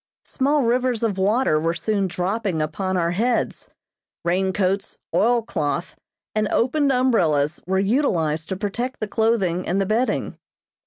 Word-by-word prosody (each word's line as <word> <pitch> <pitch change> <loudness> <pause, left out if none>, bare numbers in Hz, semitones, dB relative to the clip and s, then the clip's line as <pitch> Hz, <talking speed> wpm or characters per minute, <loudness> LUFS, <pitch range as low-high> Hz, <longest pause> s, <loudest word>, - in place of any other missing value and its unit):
Small 285 +1 +1
rivers 245 0 +1
of 205 -4 0
water 205 -4 +2
were 165 +2 0
soon 195 +3 0
dropping 185 0 -2
upon 185 +5 -1
our 170 -1 +1
heads. 230 +6 -1 0.6
Rain 190 +2 +1
coats, 195 +1 -1 0.2
oil 235 +1 +3
cloth, 165 -4 -2 0.4
and 215 -1 +1
opened 275 +6 +2
umbrellas 175 - +2
were 190 +1 +1
utilized 180 - +1
to 190 - -2
protect 235 +6 -3
the 215 - -2
clothing 205 -6 0
and 185 +3 +1
the 195 - +1
bedding. 225 +6 -1
195 Hz, 145 wpm, -22 LUFS, 175-235 Hz, 0.6 s, oil